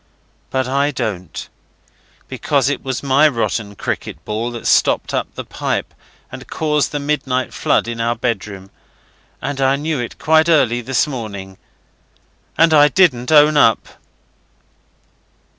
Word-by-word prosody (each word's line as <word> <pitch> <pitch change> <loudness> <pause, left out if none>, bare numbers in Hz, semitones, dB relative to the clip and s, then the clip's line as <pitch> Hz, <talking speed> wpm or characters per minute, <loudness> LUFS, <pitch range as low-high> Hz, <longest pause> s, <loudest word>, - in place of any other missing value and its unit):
But 130 -1 -1
I 140 +2 +1
don't, 110 - -5 0.8
because 140 -2 0
it 145 - -3
was 130 -1 -4
my 140 +3 +4
rotten 115 -6 -2
cricket - - -5
ball 110 +3 -2
that 120 -1 -8
stopped - - +2
up - - -2
the - - -5
pipe - - -3 0.4
and - - -10
caused 150 -2 0
the 145 - -2
midnight 140 -3 -2
flood - - +1
in 115 -1 -4
our 115 +1 0
bedroom. 100 -5 -4 0.7
And 135 +1 -3
I 135 0 +3
knew 150 0 -2
it 120 - -5
quite 160 +2 +3
early 120 -7 +3
this 130 +3 +1
morning. 100 -9 -7 1.0
And 165 -1 +4
I 145 -1 +7
didn't 145 -7 +2
own 150 0 +6
up. 115 -6 +3
130 Hz, 140 wpm, -18 LUFS, 115-145 Hz, 1.0 s, I